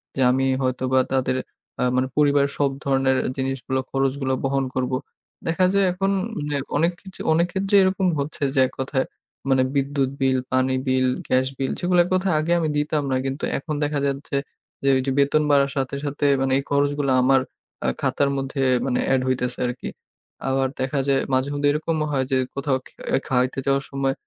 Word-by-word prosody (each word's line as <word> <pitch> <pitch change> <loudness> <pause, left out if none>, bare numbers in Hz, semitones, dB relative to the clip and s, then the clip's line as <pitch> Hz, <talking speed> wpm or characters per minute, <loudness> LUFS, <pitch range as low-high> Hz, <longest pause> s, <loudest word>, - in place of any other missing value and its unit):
যে 135 - -1
আমি 135 +1 +1 0.2
হয়তো 130 0 -1
বা 130 - +6
তাদের 130 -1 +1 0.5
আ - - +3
মানে 130 0 +2
পরিবারের 140 -1 +3
সব 140 - +3
ধরনের 135 -1 +2 0.2
জিনিসগুলো 130 0 -2
খরচগুলো 135 0 0
বহন 135 0 +1
করবো। 130 0 0 0.5
দেখা 170 +3 +2
যায় 200 -1 +4
এখন, 195 +2 0 0.4
হ্যাঁ 140 -2 -1
অনেক 165 +4 +3
কিচ 190 -1 -12 0.2
অনেক 170 +2 +3
ক্ষেত্রে 195 +1 0
এরকম 190 0 +1
হচ্ছে 145 +2 -4
যে 135 - +3
এক 130 - -13
কথায় 135 0 0 0.4
মানে 130 -1 +4
বিদ্যুৎ 140 -1 +1
বিল, 130 -1 +3
পানি 130 0 +2
বিল, 130 0 +2 0.2
গ্যাস 130 0 +2
বিল 135 -1 -1
সেগুলো 175 0 +2
এক 175 - -6
কথায় 185 -2 +1
আগে 155 +2 -1
আমি 160 - 0
দিতাম 150 0 0
না - - +2
কিন্তু 135 +2 -4
এখন 150 +2 -4
দেখা 145 -1 0
যাচ্ছে 140 0 -3 0.5
যে - - 0
ঐযে 130 +1 -1
বেতন 140 +2 +3
বাড়ার 140 -1 +4
সাথে, 135 0 -1
সাথে 145 0 -2 0.2
মানে 135 0 +1
এই 140 - -1
খরচগুলো 145 -1 +1
আমার 135 +1 +4 0.4
আ - - +2
খাতার 140 - +1
মধ্যে 135 0 -3 0.2
মানে 125 -2 0
এড 130 - +3
হইতেছে 125 -1 -1
আরকি। 125 +1 -5 0.6
আবার 135 0 +2
দেখা 135 +2 -1
যায় 135 -1 +3
মাঝে-মধ্যে 145 +2 +1
এরকমও 155 +1 -1
হয় 130 -2 +1
যে 130 - +3 0.2
কোথাও 140 -1 0
খ - - -21 0.4
খাওয়াইতে 125 +1 +1
যাওয়ার 135 0 +2
সময় 135 -1 0
135 Hz, 185 wpm, -23 LUFS, 130-145 Hz, 0.6 s, বা